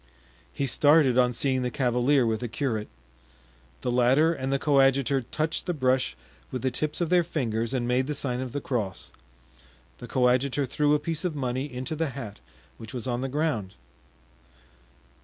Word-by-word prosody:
He 140 Hz, -, -2 dB
started 145 Hz, -1 st, +4 dB
on 125 Hz, -1 st, +4 dB
seeing 130 Hz, +1 st, 0 dB
the 125 Hz, -, -1 dB
cavalier 125 Hz, +2 st, +2 dB
with 110 Hz, -1 st, 0 dB
the 125 Hz, -, -3 dB
curate. 115 Hz, -3 st, -2 dB, 0.9 s
The 125 Hz, -, -1 dB
latter 130 Hz, +7 st, +4 dB
and 135 Hz, -3 st, -3 dB
the 135 Hz, -, +2 dB
coadjutor 135 Hz, -1 st, +3 dB
touched 155 Hz, +9 st, -3 dB
the 180 Hz, -, -1 dB
brush 130 Hz, -, +1 dB, 0.3 s
with 130 Hz, -2 st, -5 dB
the 130 Hz, -, +1 dB
tips 155 Hz, +6 st, -2 dB
of 170 Hz, 0 st, -1 dB
their 180 Hz, -1 st, +5 dB
fingers 115 Hz, -8 st, -2 dB
and 125 Hz, -3 st, -1 dB
made 125 Hz, +2 st, +1 dB
the 150 Hz, -, -2 dB
sign 125 Hz, -2 st, -1 dB
of 130 Hz, -2 st, -5 dB
the 145 Hz, -, -3 dB
cross; 105 Hz, -9 st, -3 dB, 0.9 s
the 120 Hz, -, -8 dB
coadjutor 130 Hz, +3 st, +2 dB
threw 145 Hz, +3 st, +2 dB
a -, -, +1 dB
piece 165 Hz, +2 st, -3 dB
of 175 Hz, -4 st, -2 dB
money 130 Hz, +1 st, -2 dB
into 130 Hz, +6 st, -4 dB
the 160 Hz, -1 st, -1 dB
hat, 105 Hz, -6 st, -7 dB, 0.4 s
which 110 Hz, +2 st, -9 dB
was 120 Hz, -, -4 dB
on 120 Hz, -1 st, -2 dB
the 135 Hz, -, -2 dB
ground. 135 Hz, -10 st, -1 dB
130 Hz, 175 wpm, -27 LUFS, 125-145 Hz, 0.9 s, their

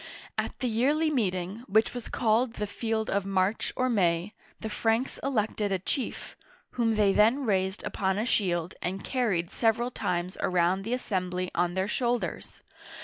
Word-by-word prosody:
At -, -, -2 dB
the 255 Hz, -, +1 dB
yearly 285 Hz, +8 st, +2 dB
meeting, 190 Hz, -5 st, -1 dB
which 220 Hz, +1 st, +3 dB
was 245 Hz, -2 st, -6 dB
called 230 Hz, 0 st, +2 dB
the 210 Hz, -, -2 dB
Field 220 Hz, +1 st, -2 dB
of 200 Hz, 0 st, 0 dB
March 195 Hz, +2 st, 0 dB
or 255 Hz, -, +1 dB
May, 185 Hz, -4 st, +1 dB, 0.3 s
the 220 Hz, -, -4 dB
Franks 225 Hz, +3 st, 0 dB
elected 215 Hz, -5 st, 0 dB
a 190 Hz, -, +2 dB
chief, 245 Hz, +8 st, -4 dB, 0.4 s
whom 230 Hz, -2 st, +1 dB
they 205 Hz, -2 st, +4 dB
then 235 Hz, +7 st, +4 dB
raised 190 Hz, -2 st, 0 dB
upon 190 Hz, -1 st, -1 dB
a 215 Hz, -, 0 dB
shield, 180 Hz, -7 st, 0 dB
and 190 Hz, +2 st, -3 dB
carried 205 Hz, -10 st, 0 dB
several 235 Hz, +2 st, +1 dB
times 180 Hz, -4 st, -2 dB
around 180 Hz, +1 st, +2 dB
the 230 Hz, -, -1 dB
assembly 185 Hz, -6 st, -2 dB
on 175 Hz, +1 st, 0 dB
their 190 Hz, +1 st, 0 dB
shoulders. 240 Hz, +2 st, -2 dB
210 Hz, 160 wpm, -28 LUFS, 185-235 Hz, 0.4 s, they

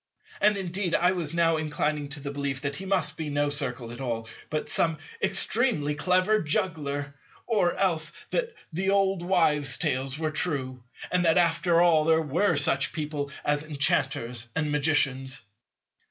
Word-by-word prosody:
And 210 Hz, -1 st, +4 dB
indeed 185 Hz, -1 st, -1 dB
I 180 Hz, +1 st, +3 dB
was 170 Hz, -5 st, -3 dB
now 165 Hz, -1 st, +2 dB
inclining 150 Hz, -1 st, -2 dB
to 145 Hz, +1 st, -5 dB
the 140 Hz, 0 st, -5 dB
belief 140 Hz, -2 st, -3 dB
that 140 Hz, -1 st, -2 dB
he 190 Hz, -, -6 dB
must 185 Hz, -5 st, 0 dB
be 155 Hz, -2 st, -4 dB
no 145 Hz, 0 st, 0 dB
Circle 125 Hz, -5 st, -3 dB
at 120 Hz, -, -8 dB
all, 115 Hz, -3 st, -3 dB, 0.2 s
but 155 Hz, -, -2 dB
some 165 Hz, -2 st, +1 dB, 0.2 s
extremely 195 Hz, -, +2 dB
clever 185 Hz, +8 st, +2 dB
juggler; 150 Hz, -5 st, -1 dB, 0.3 s
or 205 Hz, -7 st, +1 dB
else 160 Hz, -5 st, +1 dB, 0.2 s
that 475 Hz, -2 st, -1 dB, 0.2 s
the 190 Hz, +4 st, -1 dB
old 195 Hz, -2 st, +2 dB
wives' 150 Hz, -7 st, +2 dB
tales 130 Hz, +2 st, -1 dB
were 155 Hz, -1 st, -2 dB
true, 135 Hz, -6 st, -3 dB, 0.3 s
and 180 Hz, -1 st, +2 dB
that 165 Hz, +1 st, +4 dB
after 170 Hz, 0 st, +3 dB
all 160 Hz, -3 st, +4 dB
there 160 Hz, 0 st, +4 dB
were 165 Hz, +4 st, +1 dB
such 135 Hz, -2 st, +2 dB
people 150 Hz, -2 st, -3 dB, 0.2 s
as 145 Hz, 0 st, +1 dB
Enchanters 130 Hz, -5 st, 0 dB
and 150 Hz, -2 st, 0 dB
Magicians. 135 Hz, -3 st, +1 dB
155 Hz, 160 wpm, -27 LUFS, 140-180 Hz, 0.3 s, And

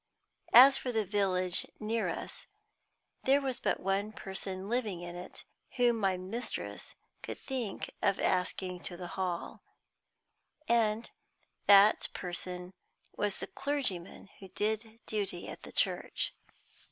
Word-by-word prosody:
As 265 Hz, +3 st, +10 dB
for 250 Hz, -, -3 dB
the 220 Hz, -3 st, +1 dB
village 185 Hz, -2 st, +2 dB
near 220 Hz, +1 st, 0 dB
us, -, -, -6 dB, 0.8 s
there 275 Hz, +2 st, +5 dB
was 265 Hz, -3 st, -2 dB
but -, -, 0 dB
one 195 Hz, +3 st, 0 dB
person 190 Hz, -2 st, -4 dB
living 215 Hz, -7 st, -1 dB
in 175 Hz, 0 st, -6 dB
it 180 Hz, -, -8 dB, 0.3 s
whom 240 Hz, -2 st, +4 dB
my 190 Hz, -3 st, +2 dB
mistress 195 Hz, +7 st, -5 dB, 0.3 s
could -, -, -6 dB
think 245 Hz, -7 st, -3 dB
of 200 Hz, -, +2 dB
asking 180 Hz, 0 st, 0 dB
to 175 Hz, -, -4 dB
the 175 Hz, -1 st, -6 dB
Hall, 180 Hz, -2 st, -3 dB, 1.1 s
and 230 Hz, -1 st, +2 dB, 0.6 s
that 200 Hz, +1 st, +7 dB
person 180 Hz, 0 st, -4 dB, 0.4 s
was 205 Hz, -2 st, 0 dB
the -, -, -4 dB
clergyman 235 Hz, -11 st, -3 dB
who 195 Hz, -, -10 dB
did 220 Hz, +3 st, -2 dB
duty 200 Hz, -5 st, -3 dB
at -, -, -8 dB
the -, -, -10 dB
church. -, -, 0 dB
200 Hz, 130 wpm, -32 LUFS, 185-230 Hz, 1.1 s, As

